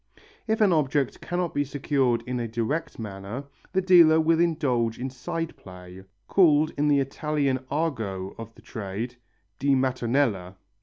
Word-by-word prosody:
If 220 0 0
an 200 -4 +5
object 145 -3 0
cannot 175 -1 -2
be 145 - +1
secured 135 -4 0
in 125 0 -3
a 120 - -2
direct 120 +8 -3
manner, 105 +3 -6 0.3
the 190 0 +1
dealer 170 -4 +7
will 160 +1 +3
indulge 135 -9 +1
in 130 +2 -4
side 160 +6 -4
play, 90 0 -12 0.2
called 155 -5 +4
in 145 +1 +1
the 145 -1 +4
Italian 140 0 -1
argot 110 - -2
of 115 0 -9
the 115 - -18
trade, 110 +3 -5 0.4
di 140 0 +3
mattonella. 125 -7 0
135 Hz, 150 wpm, -26 LUFS, 115-155 Hz, 0.4 s, dealer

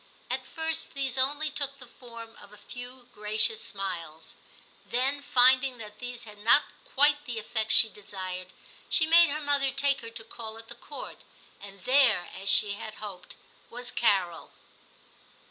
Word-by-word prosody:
At - - -4
first 320 -3 -3
these 270 -3 -2
only 290 +4 0
took 280 -2 -2
the 260 - -12
form 230 -2 -13
of 205 - -14
a 210 - -14
few 245 +3 -10
gracious 215 +1 +1
smiles. 170 -5 -5 0.5
Then 270 +4 -1
finding 255 0 +3
that 210 -2 -11
these 245 -1 -7
had 210 -2 -13
not 230 +7 +4 0.2
quite 290 +1 +3
the 240 -3 -5
effect 220 0 -3
she 225 - +7
desired, 190 -4 -8 0.4
she 320 - +4
made 335 +1 +6
her 300 +2 -2
mother 285 -2 +2
take 275 +1 0
her 230 - -9
to 230 0 -8
call 225 -1 -6
at 225 0 -14
the - - -7
Court, - - -9 0.4
and 195 -1 -13
there, 250 -8 +3
as 195 +1 -4
she 205 +1 +8
had 210 +1 -7
hoped, 200 -4 -9 0.3
was 245 +1 -4
Carol. 185 -7 0
235 Hz, 165 wpm, -27 LUFS, 210-275 Hz, 0.5 s, she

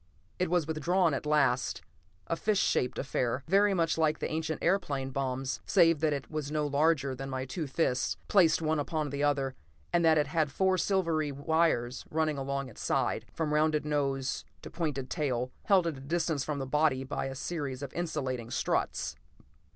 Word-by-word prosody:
It 180 - +1
was 175 -2 +2
withdrawn 160 +2 +1
at 140 - -3
last; 140 -4 +2 0.4
a 165 - -1
fish 210 +4 0
shaped 125 - +1
affair, 130 -1 -1
very 200 +3 +4
much 165 -2 +1
like 155 -1 +2
the - - -3
ancient 160 0 -2
airplane 150 -8 0
bombs 130 0 -2
save 165 -5 +4
that 155 0 +2
it 140 0 -4
was 150 -2 -3
no 150 -1 0
larger 145 -1 +2
than 135 +1 -6
my 130 0 -3
two 150 +4 -4
fists, 130 -3 0
placed 165 -5 +4
one 155 0 +1
upon 150 0 -2
the 140 0 -3
other, 140 -2 +1 0.4
and 175 - +3
that 160 -1 +5
it 150 - +3
had 150 0 0
four 190 +4 +2
silvery 165 -6 +1
wires 140 -4 +1
running 155 -2 0
along 140 0 -2
its 120 - -11
sides, - - 0
from 155 -2 -2
rounded 155 0 +2
nose 135 -3 -1 0.2
to - - -8
pointed 150 -6 -2
tail, 130 -5 -1
held 190 -4 +4
at 165 -4 -2
a - - -10
distance 160 0 -1
from 150 0 -3
the 135 - -3
body 145 -1 +2
by 135 0 -3
a 135 - -5
series 140 -3 -4
of 140 - -6
insulating 130 -8 -3
struts. - - -1
150 Hz, 185 wpm, -30 LUFS, 135-165 Hz, 0.4 s, that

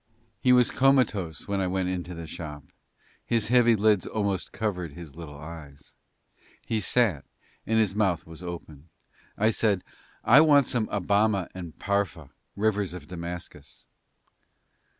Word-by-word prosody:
He 125 - +3
was 125 -1 +5
comatose 120 - +2
when 100 -1 -1
I 95 - 0
went 95 0 -1
into 90 -1 -4
the 85 0 -7
shop, 75 -2 -8 0.6
his 115 -3 0
heavy 120 -2 +5
lids 105 -2 +2
almost 100 -3 -2
covered 90 -8 -3
his 85 -4 -11
little 80 -4 -9
eyes; 75 -2 -11 0.7
he 110 -2 -1
sat, 95 - +2 0.4
and 110 - +2
his 105 -4 +2
mouth 95 -5 0
was 80 +1 -12
open. 85 -3 -8 0.5
I 110 +2 +3
said, 105 -4 +1 0.4
"I 135 +6 +7
want 145 -3 +5
some 115 -3 -1
of 100 -3 -2
Abama 100 -1 +2
and 85 -4 -8
Pharpah, 100 -6 -2 0.3
rivers 100 -3 0
of 90 - -9
Damascus." 85 -6 -8
95 Hz, 145 wpm, -27 LUFS, 85-110 Hz, 0.7 s, I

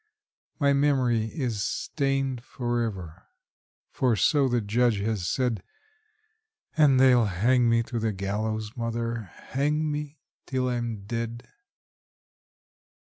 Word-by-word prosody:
My 140 -2 +4
memory 130 -5 +2
is 115 -4 -3
stained 135 -4 -1
forever; 115 - -4 0.6
for 125 -4 +2
so 140 +5 +3
the 120 -1 +1
Judge 115 +1 +2
has 105 -4 -1
said, 125 -6 0 1.1
And 145 -5 +5
they'll 125 -3 +6
hang 120 +6 +2
me 115 0 +3
to 115 0 -4
the 110 0 0
gallows, 105 +3 -3
mother 115 -3 -3
hang 150 +3 -1
me 150 0 -5 0.3
till 130 -1 0
I'm 120 -4 -3
dead! 115 +2 -4
120 Hz, 110 wpm, -27 LUFS, 110-135 Hz, 1.1 s, they'll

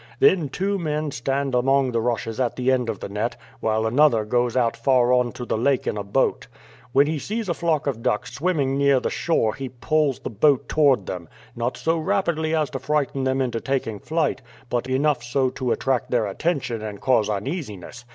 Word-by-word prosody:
Then 175 - +4
two 195 +7 -1
men 155 -2 -2
stand 135 +2 -2
among 135 +1 +2
the 115 -1 0
rushes 115 0 -2
at 125 -2 0
the 130 +1 +1
ends 125 -3 +1
of 110 - -4
the - - -4
net, 105 +4 -2 0.2
while 110 0 0
another 120 -2 +3
goes 120 +2 0
out 115 -2 +2
far 125 0 +3
on 125 -1 +2
to 125 - -6
the 110 - -1
lake 135 +1 +1
in - - -1
a 105 - -3
boat. 100 - 0 0.4
When 140 +3 +5
he 155 0 -2
sees 220 +6 -3
a 170 - +1
flock 165 -3 0
of 130 -5 -2
ducks 105 - -1
swimming 140 -4 0
near 140 -2 +4
the - - -2
shore 115 -10 +1
he 135 -1 -6
poles 140 +3 0
the - - -6
boat 135 +5 +2
toward 140 -10 +3
them; 85 -3 -6 0.3
not 120 +1 -2
so 165 0 0
rapidly 160 -1 0
as 155 -2 0
to 135 - -4
frighten 135 -1 -1
them 130 0 +1
into 120 -3 -1
taking 125 -6 -2
flight, 155 0 -1 0.3
but 120 +1 -1
enough 140 +1 +1
so 130 +2 0
to 130 -2 -2
attract 130 -2 0
their 120 -3 +1
attention 130 - -2
and 105 -2 -6
cause 120 -5 +2
uneasiness. 120 - -5
130 Hz, 205 wpm, -23 LUFS, 115-150 Hz, 0.4 s, When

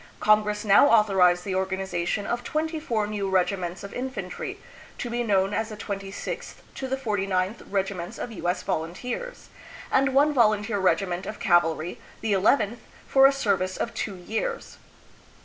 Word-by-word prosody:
Congress 210 0 +2
now 205 +7 +7
authorized 190 -5 +4
the 195 - -2
organization 190 0 -1
of 240 0 -2
twenty 315 +4 -2
four 230 -8 -1
new 205 -2 -3
regiments 180 -1 0
of 200 - -8
infantry, 265 - -5 0.4
to 240 - -4
be 240 +1 -1
known 195 -3 +2
as 220 +1 -1
the 215 - -8
26th 195 -1 -5 0.2
to 265 - -5
the 265 +1 -1
49th 195 -4 -1
Regi 195 0 0
ments 180 +4 -7
of 240 - -5
U. 180 -4 -3
S. 180 - -1
Volunteers, 245 - -4 0.4
and 270 +1 +4
1 270 - -2
one 295 +2 +5
volunteer 215 -4 +2
regiment 185 -1 +1
of 215 - -6
cavalry, 175 -4 +2 0.2
the 220 -2 0
llth, 210 +3 +3 0.3
for 270 0 +7
a - - +4
service 195 -8 0
of 230 - -3
two 200 - -3
years. 225 - -4
205 Hz, 165 wpm, -26 LUFS, 190-240 Hz, 0.4 s, now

